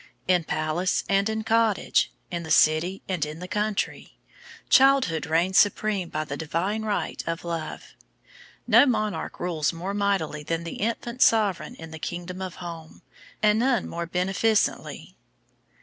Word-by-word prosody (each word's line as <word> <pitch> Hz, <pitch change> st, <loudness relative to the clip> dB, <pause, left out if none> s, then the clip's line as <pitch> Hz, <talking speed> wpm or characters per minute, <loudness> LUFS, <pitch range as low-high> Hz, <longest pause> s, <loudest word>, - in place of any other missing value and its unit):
In 180 Hz, -3 st, +3 dB
palace 155 Hz, +5 st, 0 dB
and 200 Hz, +2 st, +2 dB
in 220 Hz, 0 st, -2 dB
cottage, 225 Hz, -2 st, +2 dB, 0.2 s
in 170 Hz, -1 st, -3 dB
the 160 Hz, -, -8 dB
city 155 Hz, +5 st, +3 dB
and 185 Hz, -5 st, -1 dB
in 150 Hz, +1 st, -4 dB
the 180 Hz, +2 st, -7 dB
country, 210 Hz, +2 st, -2 dB, 0.5 s
childhood 270 Hz, -, +4 dB
reigns 170 Hz, +4 st, +3 dB
supreme 205 Hz, -3 st, +1 dB
by 155 Hz, -, -2 dB
the 140 Hz, -2 st, -5 dB
divine 170 Hz, +8 st, -2 dB
right 215 Hz, -2 st, -2 dB
of 165 Hz, +1 st, -3 dB
love. 165 Hz, -2 st, -5 dB, 0.7 s
No 285 Hz, -, +6 dB
monarch 215 Hz, -4 st, -2 dB
rules 165 Hz, -4 st, 0 dB
more 180 Hz, +3 st, -5 dB
mightily 195 Hz, -7 st, 0 dB
than 165 Hz, +2 st, -3 dB
the 170 Hz, -, -6 dB
infant 235 Hz, +3 st, -3 dB
sovereign 210 Hz, -5 st, +3 dB
in 160 Hz, 0 st, -10 dB
the 160 Hz, -, -8 dB
Kingdom 175 Hz, +3 st, -5 dB
of 185 Hz, -2 st, -5 dB
Home, 165 Hz, -3 st, -9 dB, 0.4 s
and 210 Hz, +1 st, +4 dB
none 245 Hz, -3 st, +1 dB
more 170 Hz, 0 st, -4 dB
beneficently. 195 Hz, +5 st, 0 dB
185 Hz, 150 wpm, -25 LUFS, 165-210 Hz, 0.7 s, No